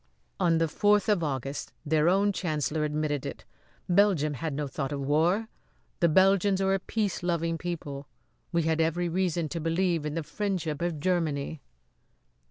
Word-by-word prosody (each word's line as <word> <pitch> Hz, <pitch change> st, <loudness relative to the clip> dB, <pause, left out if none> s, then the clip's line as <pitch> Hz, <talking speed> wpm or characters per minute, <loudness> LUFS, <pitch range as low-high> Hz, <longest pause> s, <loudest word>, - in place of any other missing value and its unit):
"On 165 Hz, -2 st, +3 dB
the 165 Hz, 0 st, +2 dB
fourth 205 Hz, +5 st, +2 dB
of 205 Hz, -5 st, +3 dB
August 135 Hz, -1 st, -3 dB
their 155 Hz, +2 st, +3 dB
own 200 Hz, +2 st, +3 dB
chancellor 155 Hz, -3 st, -1 dB
admitted 150 Hz, -2 st, -1 dB
it. 140 Hz, -, -7 dB, 0.4 s
Belgium 180 Hz, -5 st, +3 dB
had 160 Hz, +3 st, -3 dB
no 145 Hz, +1 st, -2 dB
thought 135 Hz, +1 st, -4 dB
of 140 Hz, -1 st, -3 dB
war. 165 Hz, +10 st, +2 dB, 0.5 s
The 170 Hz, -, +4 dB
Belgians 190 Hz, +3 st, +4 dB
are 195 Hz, 0 st, +2 dB
a 195 Hz, -, +1 dB
peace 205 Hz, 0 st, -2 dB
loving 170 Hz, -1 st, 0 dB
people, 145 Hz, -5 st, -5 dB, 0.4 s
who 170 Hz, -, +2 dB
had 160 Hz, 0 st, +1 dB
every 170 Hz, +2 st, 0 dB
reason 175 Hz, -2 st, 0 dB
to 170 Hz, -, -3 dB
believe 165 Hz, 0 st, +1 dB
in 150 Hz, 0 st, -3 dB
the 165 Hz, -, -2 dB
friendship 165 Hz, -2 st, -3 dB
of 170 Hz, -3 st, -1 dB
Germany." 160 Hz, -3 st, -1 dB
165 Hz, 165 wpm, -28 LUFS, 150-185 Hz, 0.5 s, The